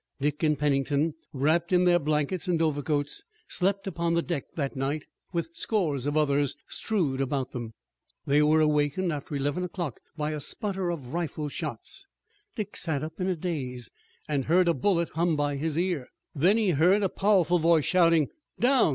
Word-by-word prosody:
Dick 145 +1 -1
and 150 -2 +2
Pennington, 145 +2 +1 0.2
wrapped 155 +5 +1
in 180 0 +4
their 175 -1 +5
blankets 150 +4 0
and 175 -2 +1
overcoats, 145 - 0 0.2
slept 195 +1 0
upon 170 -3 -1
the 170 - +2
deck 170 -6 -3
that 140 -3 -2
night, 140 +3 -2 0.3
with 170 -2 -2
scores 150 - 0
of 145 +1 0
others 145 -2 +2
strewed 160 -12 -1
about 135 -1 -1
them. 115 -3 -6 0.5
They 145 +2 +4
were 155 +1 +4
awakened 150 +3 +1
after 145 0 -5
eleven 145 +5 -1
o'clock 175 - -4 0.2
by 150 0 -1
a 150 - -3
sputter 190 +4 -1
of 140 -6 -5
rifle 160 -3 -2
shots. - - -5 0.5
Dick 210 -3 -4
sat 155 -5 0
up 155 +4 -6
in 180 - 0
a 185 - +1
daze 135 -8 -4 0.4
and 140 -3 -1
heard 175 +3 +4
a 170 - +4
bullet 170 +4 +1
hum 165 +1 +1
by 145 -1 0
his 155 +1 -2
ear. 175 -7 0 0.3
Then 180 +9 +3
he 215 -5 +2
heard 180 +7 +4
a - - +4
powerful 185 -3 +3
voice 165 -2 +4
shouting: 165 -5 +4 0.3
"Down! 250 -5 +4
155 Hz, 175 wpm, -27 LUFS, 145-180 Hz, 0.5 s, their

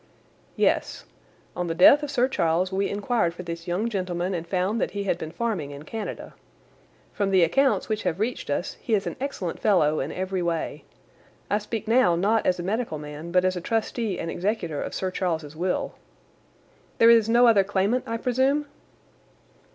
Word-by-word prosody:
"Yes. - - 0 0.5
On 180 - -2
the 165 - -2
death 190 - +7
of 295 - -4
Sir 255 -2 +2
Charles 180 -6 0
we 195 +1 0
inquired 205 -4 0
for 180 - -7
this 170 -1 -7
young 180 +6 0
gentleman 185 -3 -2
and 170 -1 -4
found 190 +5 0
that - - 0
he 200 - -1
had 195 - -1
been 160 - -5
farming 195 -6 -3
in 145 0 -9
Canada. 215 +6 -6 0.8
From 200 -2 0
the 190 -2 +4
accounts 270 +9 +2
which 215 -1 -1
have 170 +2 -2
reached 230 -4 -2
us 145 +5 -2
he 225 - +1
is 195 - -1
an - - -4
excellent 200 -11 -4
fellow 155 -7 +3
in 140 - -3
every 185 0 -3
way. 170 -2 -3 0.7
I 205 - +3
speak 215 +1 -5
now 225 -7 +4
not 210 +6 +1
as 180 -1 +2
a - - -3
medical 210 -3 -2
man 150 +3 -8
but 180 +1 +3
as 185 0 +1
a 180 - -4
trustee 225 -1 -1
and 165 - -4
executor 175 -6 -2
of - - -5
Sir 190 -1 -2
Charles's 160 -5 -3
will." 180 +3 -2 1.0
"There 230 0 +7
is 225 -1 +5
no 240 +2 +5
other 220 -4 +5
claimant, 205 +5 0
I 230 - -2
presume?" 265 +5 +1
190 Hz, 190 wpm, -25 LUFS, 170-225 Hz, 1.0 s, death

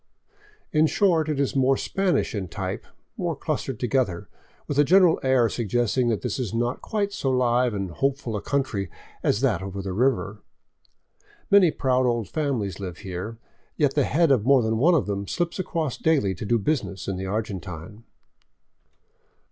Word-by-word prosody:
In 155 0 +4
short, 165 -4 +2
It 150 -2 -1
Is 140 -1 0
more 135 0 +3
Spanish 195 -2 0
in 100 -4 -3
type, - - -5 0.3
more - - -1
clustered 130 -5 -3
together, 120 -7 0 0.4
with 145 - -1
a - - +7
general 180 +2 +5
air 130 -3 +3
suggesting 120 +3 0
that 110 - -1
this 125 0 -2
is 115 -3 -3
not 120 +1 -1
quite 205 -2 -2
so 135 - -1
live 125 -2 +2
and 95 -3 -3
hopeful 135 +1 -1
a 105 - -3
country 115 -8 -1 0.3
as 105 - +1
that 120 -10 +1
over 95 0 -6
the 95 -1 -4
river. 105 -3 0 1.1
Many 200 -4 +7
proud 130 -3 +1
old 120 -4 0
families 125 - -2
live 90 -3 -6
here; 95 +5 -5 0.4
yet 145 -3 +2
the 145 - +2
head 165 0 +3
of 125 -6 +3
more 135 0 +4
than 110 0 0
one 170 +7 +5
of 150 - +2
them 100 -1 -3
slips 175 0 -2
across 160 -6 -2
daily 140 -12 +2
to 95 - -7
do 120 - +3
business 115 - -2
in 95 - -2
the 95 +1 -4
Argentine. 100 -1 -5
125 Hz, 170 wpm, -25 LUFS, 100-140 Hz, 1.1 s, a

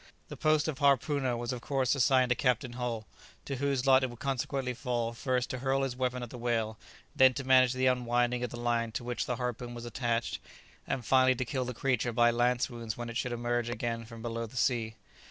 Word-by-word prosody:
The - - -6
post 155 0 +2
of 145 -3 -3
harpooner 140 -2 +2
was 120 +2 -3
of 125 - -6
course 135 -2 +1
assigned 130 -1 +3
to 125 - +3
Captain 125 -1 0
Hull, 120 -3 -3 0.4
to 140 - -3
whose 140 -1 0
lot 135 -1 +6
it 130 - 0
would 120 - -10
consequently 135 0 -2
fall 120 -1 -2
first 125 +1 -1
to 130 - -4
hurl 135 +1 +1
his 130 -2 -2
weapon 125 -1 -1
at 120 - -7
the 125 - -8
whale, 115 -2 -1 0.4
then 130 -1 +6
to 135 - -3
manage 130 -1 +5
the 130 0 0
unwinding 120 -1 +1
of 125 - -1
the 120 - -7
line 120 -1 0
to - - -3
which 120 0 -3
the 125 - -1
harpoon 125 0 -4
was 120 0 -7
attached, 120 -4 -2 0.5
and 125 - -2
finally 130 0 +4
to 130 - -2
kill 130 0 -2
the 125 -1 -5
creature 125 -2 0
by 120 +1 +4
lance 120 +1 +2
wounds 115 -3 -6
when 120 -1 -5
it 115 - -3
should 125 - -2
emerge 120 0 -1
again 115 0 -3
from 115 0 -11
below 115 -1 -3
the 125 - -11
sea. 115 -3 0
125 Hz, 225 wpm, -30 LUFS, 120-130 Hz, 0.5 s, lot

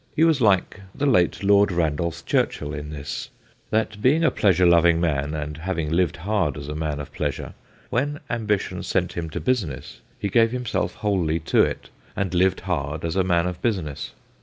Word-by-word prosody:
He 160 - +3
was 160 -5 +4
like 100 -2 +2
the 145 - -1
late 100 -9 +2
Lord 100 0 +5
Randolph 85 0 -1
Churchill 75 0 0
in 75 0 -6
this, 75 -1 -6 0.4
that 110 -1 -1
being 150 +8 +3
a 165 - +4
pleasure 90 -3 +3
loving 85 -1 +5
man, 75 -3 0
and 75 -1 -4
having 85 -2 -3
lived 85 -2 +1
hard 90 -6 0
as 70 0 -7
a 75 - -4
man 75 -1 -3
of 75 0 -8
pleasure, - - -3 0.4
when 145 +4 0
ambition 110 -4 -1
sent - - -1
him 85 -2 -4
to - - -4
business 90 - -2 0.2
he - - -2
gave 115 +3 +4
himself 125 -2 -2
wholly 90 -7 0
to 80 - +3
it - - -1 0.2
and 95 -2 -2
lived 95 +1 +2
hard 80 -3 -3
as 85 +1 -2
a 95 - +3
man 85 -2 +2
of 90 0 -4
business. 90 - -2
90 Hz, 185 wpm, -24 LUFS, 75-105 Hz, 0.4 s, Lord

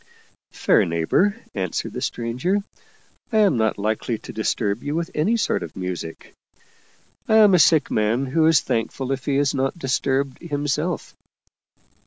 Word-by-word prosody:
" - - -46
Fair - - +3
neighbor," 85 - +1 0.2
answered 95 -4 -3
the - - -5
stranger, 125 +13 -1 0.3
" - - -37
I 220 - +1
am 205 -8 +4
not 110 -1 +1
likely 110 +2 -1
to - - -10
disturb 110 0 -1
you 145 +1 -2
with 170 0 -2
any 195 +10 +1
sort 220 - 0
of - - -8
music. 90 -3 -6 0.9
I 220 - +3
am 210 -3 +7
a 180 - +5
sick 160 -1 +4
man 110 +5 +1
who 155 +4 +2
is 160 -3 +5
thankful 125 +3 -2
if 135 -1 -3
he 140 -1 +1
is 140 0 +2
not 135 +3 -1
disturbed 135 -1 -1
himself." 150 +1 -2
135 Hz, 165 wpm, -22 LUFS, 110-165 Hz, 0.9 s, am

